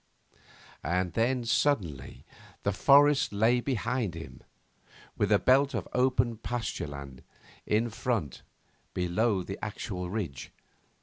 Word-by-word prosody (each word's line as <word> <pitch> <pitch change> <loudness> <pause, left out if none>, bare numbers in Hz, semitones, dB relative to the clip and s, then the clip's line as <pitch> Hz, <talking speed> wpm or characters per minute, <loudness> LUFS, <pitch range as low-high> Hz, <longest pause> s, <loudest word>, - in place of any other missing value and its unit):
And 90 -1 -1
then 120 +3 +1
suddenly 95 - 0 0.4
the 100 - +1
forest 140 +7 +5
lay 110 +4 +3
behind 120 -6 -1
him, 80 -1 -9 0.7
with - - 0
a - - +7
belt 135 +1 +3
of 100 - -3
open 125 -2 +2
pasture 120 -6 -3
land 70 -2 -9 0.5
in 110 +2 +1
front 110 - -2 0.5
below 95 +3 +1
the 95 - -7
actual 95 -4 -4
ridge. 90 -11 -5
110 Hz, 115 wpm, -29 LUFS, 90-125 Hz, 0.7 s, a